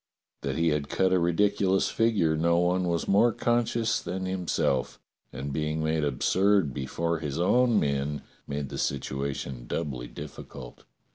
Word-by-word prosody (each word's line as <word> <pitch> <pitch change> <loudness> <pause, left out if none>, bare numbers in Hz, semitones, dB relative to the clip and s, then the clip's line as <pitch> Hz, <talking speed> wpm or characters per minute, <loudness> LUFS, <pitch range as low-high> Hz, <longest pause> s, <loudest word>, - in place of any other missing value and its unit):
That - - -2
he 85 0 +3
had 75 -2 -1
cut 95 -1 +2
a 90 - +4
ridiculous 95 +2 +2
figure 105 -9 +2
no 85 +2 +2
one 90 +1 +2
was 85 -1 -1
more 105 +5 +4
conscious 120 0 +1
than 95 0 -4
himself, 90 -8 -1 0.3
and 70 +2 -5
being 75 +1 -1
made 80 0 0
absurd 90 +4 +2
before 85 +6 -2
his 75 -3 -4
own 120 +5 +4
men 70 0 -1 0.2
made 70 -1 -3
the - - -5
situation 70 -2 -3
doubly 65 -5 -3
difficult. - - -10
85 Hz, 145 wpm, -27 LUFS, 70-95 Hz, 0.3 s, a